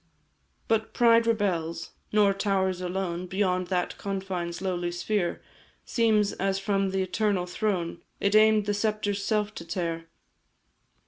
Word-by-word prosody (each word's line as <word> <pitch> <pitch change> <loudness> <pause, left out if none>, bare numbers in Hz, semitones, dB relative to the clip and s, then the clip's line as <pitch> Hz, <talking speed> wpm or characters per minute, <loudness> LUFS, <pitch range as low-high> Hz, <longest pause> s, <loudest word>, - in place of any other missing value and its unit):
"But 220 0 0
pride 230 -1 +5
rebels, 170 -7 -1 0.2
nor 205 -2 +4
towers 190 -2 0
alone 180 -1 -3
Beyond 185 -1 0
that 180 -1 -2
confine's 190 -3 -3
lowly 180 -2 -2
sphere 175 +1 -1 0.4
Seems 215 -3 +2
as 195 0 -1
from 195 0 0
the 190 0 0
Eternal 190 -1 0
Throne 180 -3 -2 0.2
It 200 0 +1
aim'd 215 -1 +5
the 205 - 0
sceptre's 205 -1 -1
self 210 0 0
to - - -7
tear. 165 -1 -3
195 Hz, 130 wpm, -27 LUFS, 180-210 Hz, 0.4 s, pride